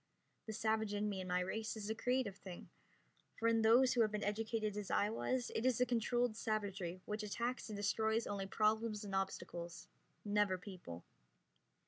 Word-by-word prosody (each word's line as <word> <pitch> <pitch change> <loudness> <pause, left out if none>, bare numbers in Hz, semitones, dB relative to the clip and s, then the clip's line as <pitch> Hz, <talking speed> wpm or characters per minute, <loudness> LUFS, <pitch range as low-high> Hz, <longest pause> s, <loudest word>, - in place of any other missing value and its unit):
The 220 - -3
savage 220 -1 +1
in 205 +1 0
me 200 -2 -2
and 185 - -6
my 180 0 +2
race 220 +5 -2
is 205 -1 -4
a - - +2
creative 245 -3 0
thing, 185 -2 -9 0.7
for 230 - +1
in 230 0 +4
those 240 +4 +6
who 240 - +3
have 215 -2 +3
been 210 -1 -2
educated 215 0 -1
as 210 -2 -4
I 205 +1 +2
was 245 +2 -1
it 225 - -1
is 255 -2 +3
a 250 - +5
controlled 240 -1 +1
savagery 200 -5 -2
which 210 +1 -2
attacks 235 +4 -2
and 210 - -4
destroys 220 +2 +1
only 195 -1 -3
problems 215 +1 +1
and 200 -2 -6
obstacles, 180 -2 -3 0.4
never 205 -2 +2
people. 180 - -8
215 Hz, 180 wpm, -38 LUFS, 200-225 Hz, 0.7 s, those